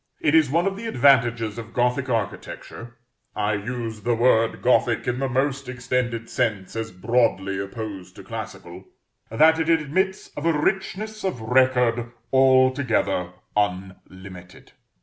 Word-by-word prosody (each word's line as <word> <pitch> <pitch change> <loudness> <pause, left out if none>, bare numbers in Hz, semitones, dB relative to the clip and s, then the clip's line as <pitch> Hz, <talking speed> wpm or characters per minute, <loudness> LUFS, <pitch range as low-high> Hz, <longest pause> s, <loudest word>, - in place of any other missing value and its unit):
It 150 - +1
is 160 -4 +5
one 170 +6 +1
of 195 0 -1
the 225 +2 -6
advantages 120 - +2
of 115 0 -10
Gothic 125 +2 0
architecture, 115 +1 -5 0.4
I 105 0 0
use 110 +1 -4
the 120 +3 +1
word 115 -1 +2
Gothic 120 -2 +2
in 125 +1 -1
the 135 -1 -1
most 135 +1 -1
extended 125 -2 -2
sense 110 -7 -2
as 115 0 -3
broadly 100 -1 0
opposed 100 -1 -7
to - - -11
classical, - - -8 0.4
that 160 +8 +4
it 160 0 0
admits 165 +5 0
of 145 +3 -4
a 165 -2 +2
richness 210 +5 -2
of 190 -11 -2
record 120 0 +2 0.2
altogether 130 -8 +3 0.2
unlimited. 95 -2 -5
120 Hz, 135 wpm, -23 LUFS, 110-135 Hz, 0.4 s, is